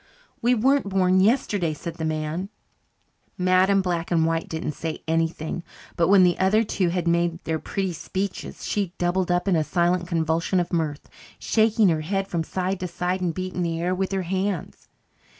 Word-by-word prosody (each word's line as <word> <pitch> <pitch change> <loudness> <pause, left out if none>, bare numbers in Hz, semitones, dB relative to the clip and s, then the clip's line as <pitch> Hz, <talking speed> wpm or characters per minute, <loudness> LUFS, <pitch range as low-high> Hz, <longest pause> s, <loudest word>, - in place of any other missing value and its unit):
"We 245 +2 +3
weren't 265 -1 +2
born 190 -1 +3
yesterday," 200 - +2
said 170 +2 -7
the 160 - -3
man. 155 +4 -2 0.9
Madam 185 +2 +3
Black 170 -2 -2
and 165 -2 +2
White 165 0 -1
didn't 160 -1 -3
say 160 +1 -5
anything, 165 +1 -1 0.3
but 170 - +2
when 195 -1 +6
the 175 -1 +3
other 205 +4 +3
two 190 -4 0
had 175 0 -1
made 170 0 +2
their 160 -1 -1
pretty 190 0 -2
speeches 190 +3 -5
she 195 -4 -1
doubled 180 +1 0
up 175 +2 +1
in 190 - +3
a 160 - +2
silent 175 +1 +1
convulsion 165 +1 0
of 175 0 -2
mirth, 155 -3 -2 0.3
shaking 220 -2 +3
her 160 -2 +1
head 195 +4 -2
from 170 -4 -1
side 185 +3 -2
to 185 - -3
side 180 +2 -2
and 175 -3 -1
beating 185 -1 -3
the 165 -1 -1
air 175 +2 0
with 190 +1 -2
her 190 -1 -1
hands. 190 0 -3
180 Hz, 185 wpm, -24 LUFS, 165-190 Hz, 0.9 s, when